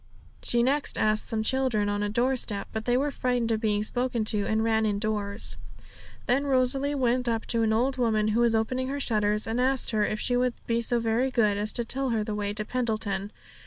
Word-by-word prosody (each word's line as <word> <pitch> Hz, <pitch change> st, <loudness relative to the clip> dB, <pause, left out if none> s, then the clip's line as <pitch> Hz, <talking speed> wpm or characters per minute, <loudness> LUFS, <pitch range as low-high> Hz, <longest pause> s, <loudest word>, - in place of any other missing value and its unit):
She 235 Hz, 0 st, +1 dB
next 280 Hz, +3 st, 0 dB
asked 215 Hz, 0 st, +1 dB
some 220 Hz, -1 st, -2 dB
children 250 Hz, -4 st, 0 dB
on 205 Hz, 0 st, -1 dB
a 205 Hz, -, -1 dB
doorstep; 235 Hz, -2 st, 0 dB
but 220 Hz, 0 st, -4 dB
they 245 Hz, 0 st, +2 dB
were 285 Hz, +2 st, 0 dB
frightened 245 Hz, -3 st, -1 dB
at 220 Hz, -1 st, 0 dB
being 210 Hz, -2 st, +1 dB
spoken 245 Hz, 0 st, -1 dB
to, 205 Hz, -1 st, 0 dB
and 220 Hz, 0 st, +1 dB
ran 220 Hz, -1 st, +2 dB
indoors. 210 Hz, 0 st, -1 dB, 0.7 s
Then 270 Hz, +4 st, +1 dB
Rosalie 270 Hz, +2 st, +1 dB
went 250 Hz, -2 st, +1 dB
up 225 Hz, -1 st, -1 dB
to 230 Hz, -, +1 dB
an 220 Hz, -1 st, +2 dB
old 255 Hz, +4 st, 0 dB
woman 215 Hz, -3 st, +1 dB
who 215 Hz, +2 st, +1 dB
was 235 Hz, -1 st, +3 dB
opening 255 Hz, +4 st, -1 dB
her 280 Hz, +2 st, -3 dB
shutters, 210 Hz, -4 st, +1 dB
and 225 Hz, +2 st, -1 dB
asked 265 Hz, 0 st, +2 dB
her 215 Hz, -2 st, +1 dB
if 215 Hz, +1 st, -1 dB
she 245 Hz, -, 0 dB
would 250 Hz, 0 st, +1 dB
be 230 Hz, 0 st, 0 dB
so 240 Hz, +1 st, +1 dB
very 230 Hz, +3 st, +1 dB
good 215 Hz, -5 st, +2 dB
as 210 Hz, +1 st, -1 dB
to 235 Hz, -, -1 dB
tell 270 Hz, +2 st, -2 dB
her 225 Hz, -3 st, 0 dB
the 210 Hz, -, -4 dB
way 205 Hz, -1 st, -2 dB
to 215 Hz, +1 st, -3 dB
Pendleton. 215 Hz, -5 st, -2 dB
230 Hz, 220 wpm, -27 LUFS, 215-250 Hz, 0.7 s, was